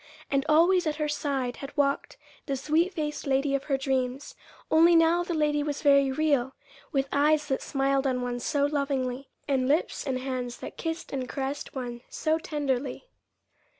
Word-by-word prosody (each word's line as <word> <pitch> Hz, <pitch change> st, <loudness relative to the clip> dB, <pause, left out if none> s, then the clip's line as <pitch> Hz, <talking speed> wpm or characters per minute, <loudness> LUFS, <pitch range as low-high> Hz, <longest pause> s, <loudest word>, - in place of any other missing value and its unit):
And 275 Hz, -1 st, +2 dB
always 345 Hz, +3 st, +4 dB
at 305 Hz, -, 0 dB
her 305 Hz, 0 st, -1 dB
side 280 Hz, -4 st, -2 dB
had 275 Hz, +1 st, -9 dB
walked 280 Hz, -1 st, 0 dB, 0.3 s
the 275 Hz, -2 st, -1 dB
sweet 320 Hz, +7 st, +1 dB
faced 300 Hz, -5 st, -4 dB
lady 275 Hz, +1 st, +1 dB
of 275 Hz, 0 st, -1 dB
her 275 Hz, -2 st, +1 dB
dreams, 265 Hz, 0 st, -2 dB, 0.4 s
only 335 Hz, +2 st, +6 dB
now 330 Hz, +1 st, +5 dB
the 345 Hz, -1 st, -2 dB
lady 300 Hz, -1 st, +1 dB
was 290 Hz, 0 st, -3 dB
very 280 Hz, -2 st, +5 dB
real, 275 Hz, -3 st, +1 dB, 0.4 s
with 275 Hz, -3 st, +1 dB
eyes 300 Hz, +1 st, +3 dB
that 265 Hz, -, 0 dB
smiled 275 Hz, 0 st, +1 dB
on 250 Hz, -1 st, 0 dB
one 245 Hz, 0 st, -3 dB
so 285 Hz, +4 st, +1 dB
lovingly, 275 Hz, -3 st, -2 dB, 0.2 s
and 265 Hz, -3 st, +1 dB
lips 300 Hz, +2 st, 0 dB
and 260 Hz, -1 st, 0 dB
hands 255 Hz, -2 st, -4 dB
that -, -, -8 dB
kissed 325 Hz, 0 st, -4 dB
and 255 Hz, -2 st, -3 dB
caressed 275 Hz, +1 st, -4 dB
one 240 Hz, -2 st, -5 dB
so 315 Hz, 0 st, 0 dB
tenderly. 285 Hz, -, -3 dB
280 Hz, 175 wpm, -27 LUFS, 265-305 Hz, 0.4 s, only